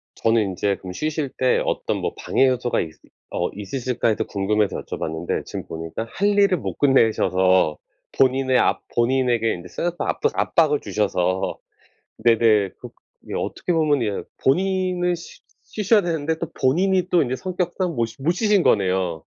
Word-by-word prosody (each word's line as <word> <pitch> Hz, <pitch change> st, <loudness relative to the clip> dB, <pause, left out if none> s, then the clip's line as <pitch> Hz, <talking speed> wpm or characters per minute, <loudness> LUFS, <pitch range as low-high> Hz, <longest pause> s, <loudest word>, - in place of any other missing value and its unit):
저는 115 Hz, 0 st, +2 dB
인제 100 Hz, +2 st, -1 dB
그럼 90 Hz, -1 st, -8 dB
쉬실 155 Hz, -, -2 dB
때 130 Hz, -1 st, +3 dB
어떤 -, -, -1 dB
뭐 -, -, -3 dB
'방해 135 Hz, -, +2 dB
요소가 125 Hz, -1 st, 0 dB
있을 80 Hz, -1 st, -6 dB, 0.3 s
어 -, -, -1 dB
있으실까?' 120 Hz, +4 st, -2 dB
해서 110 Hz, 0 st, 0 dB
궁금해서 105 Hz, +1 st, -1 dB
여쭤봤는데 80 Hz, +2 st, -4 dB
지금 -, -, -6 dB
보니까 80 Hz, +7 st, -5 dB
할 205 Hz, +1 st, 0 dB
일을 200 Hz, -3 st, +4 dB
못 -, -, -5 dB
끝내셔서 95 Hz, -, +3 dB, 0.4 s
본인의 130 Hz, -1 st, +3 dB
압 -, -, +2 dB
본인에게 120 Hz, -2 st, +2 dB
인제 90 Hz, 0 st, -9 dB
쌓였던 175 Hz, -, -3 dB
압도 -, -, +1 dB
압박을 150 Hz, -3 st, +2 dB
주셔서 95 Hz, -3 st, -1 dB, 0.6 s
네네. 110 Hz, -3 st, +3 dB
그 -, -, -9 dB, 0.4 s
예. -, -, -5 dB
어떻게 180 Hz, -, -2 dB
보면 150 Hz, -6 st, +2 dB
예 105 Hz, -2 st, -2 dB, 0.2 s
본인이 180 Hz, +3 st, +1 dB
쉬 170 Hz, -, -12 dB, 0.2 s
쉬셔야 210 Hz, 0 st, +2 dB
되는데 160 Hz, -2 st, -1 dB
또 170 Hz, -, -4 dB
본인이 180 Hz, +7 st, +2 dB
또 175 Hz, -, +4 dB
인제 130 Hz, 0 st, -2 dB
성격상 180 Hz, 0 st, -2 dB
못 115 Hz, -1 st, +1 dB
쉬 115 Hz, +4 st, -13 dB
못 165 Hz, +5 st, +2 dB
쉬신 205 Hz, 0 st, +2 dB
거네요. 90 Hz, -4 st, +1 dB
130 Hz, 330 characters per minute, -22 LUFS, 105-170 Hz, 0.6 s, 일을